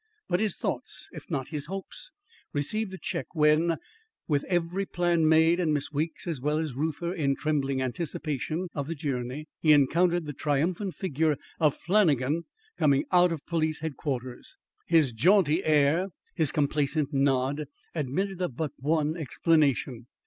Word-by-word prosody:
But 175 Hz, -, +1 dB
his 215 Hz, -4 st, 0 dB
thoughts, -, -, -4 dB
if -, -, -11 dB
not 135 Hz, -, -2 dB
his 150 Hz, -3 st, -4 dB
hopes, 195 Hz, -, -7 dB, 0.4 s
received 190 Hz, +9 st, -1 dB
a 190 Hz, -, -6 dB
check -, -, -4 dB
when, 155 Hz, +2 st, +3 dB, 0.5 s
with 145 Hz, -3 st, +1 dB
every 180 Hz, +2 st, -1 dB
plan 170 Hz, -3 st, +2 dB
made 160 Hz, +2 st, +5 dB
and 165 Hz, -4 st, +1 dB
Miss 145 Hz, 0 st, -1 dB
Weeks, 155 Hz, +3 st, -3 dB
as 160 Hz, -7 st, -3 dB
well 150 Hz, +2 st, +1 dB
as 155 Hz, -4 st, -2 dB
Reuther, 160 Hz, +5 st, -2 dB
in 140 Hz, -6 st, +1 dB
trembling 140 Hz, -3 st, 0 dB
anticipation 155 Hz, +4 st, -3 dB
of 140 Hz, -2 st, -3 dB
the 165 Hz, -, -3 dB
journey, 135 Hz, 0 st, -3 dB
he 155 Hz, -2 st, +5 dB
encountered 170 Hz, +4 st, +3 dB
the 145 Hz, -, -5 dB
triumphant 165 Hz, +7 st, -1 dB
figure 155 Hz, -4 st, 0 dB, 0.2 s
of 150 Hz, -3 st, +3 dB
Flannagan 165 Hz, -, +2 dB, 0.3 s
coming 140 Hz, -2 st, +3 dB
out 180 Hz, -1 st, +5 dB
of 160 Hz, -3 st, -5 dB
Police 155 Hz, -3 st, -1 dB
Headquarters. 135 Hz, -5 st, -5 dB, 0.3 s
His 160 Hz, -6 st, +4 dB
jaunty 170 Hz, -, +3 dB
air, 155 Hz, +4 st, +3 dB, 0.3 s
his 155 Hz, -4 st, 0 dB
complaisant 150 Hz, 0 st, 0 dB
nod, 135 Hz, +1 st, +1 dB, 0.3 s
admitted 175 Hz, +6 st, -2 dB
of 175 Hz, -9 st, -2 dB
but 155 Hz, +1 st, -2 dB
one 155 Hz, +2 st, +1 dB
explanation. 140 Hz, -6 st, +1 dB
155 Hz, 150 wpm, -28 LUFS, 140-170 Hz, 0.5 s, made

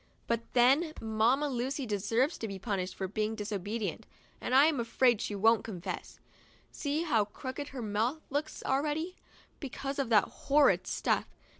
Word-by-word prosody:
But 235 Hz, 0 st, 0 dB
then 275 Hz, +7 st, +4 dB
Mamma 225 Hz, +6 st, +2 dB
Lucy 265 Hz, +1 st, -2 dB
deserves 225 Hz, -, 0 dB
to 225 Hz, -, -3 dB
be 195 Hz, -2 st, -5 dB
punished 190 Hz, -2 st, -3 dB
for 190 Hz, -, -3 dB
being 215 Hz, +3 st, -1 dB
disobedient, 210 Hz, 0 st, -4 dB, 0.3 s
and 255 Hz, -, 0 dB
I'm 290 Hz, +1 st, +5 dB
afraid 235 Hz, -1 st, +3 dB
she 205 Hz, -, -3 dB
won't 225 Hz, +3 st, +4 dB
confess. 185 Hz, -4 st, -6 dB, 0.5 s
See 295 Hz, +2 st, -1 dB
how 230 Hz, -11 st, +2 dB
crooked 260 Hz, +6 st, -6 dB
her 260 Hz, -4 st, -6 dB
mouth 225 Hz, +9 st, -1 dB
looks 300 Hz, +2 st, -3 dB
already, 300 Hz, +6 st, 0 dB, 0.4 s
because 275 Hz, 0 st, -5 dB
of 270 Hz, -4 st, 0 dB
that 210 Hz, -4 st, +6 dB
horrid 285 Hz, +1 st, +2 dB
stuff. -, -, 0 dB
240 Hz, 150 wpm, -31 LUFS, 215-280 Hz, 0.5 s, that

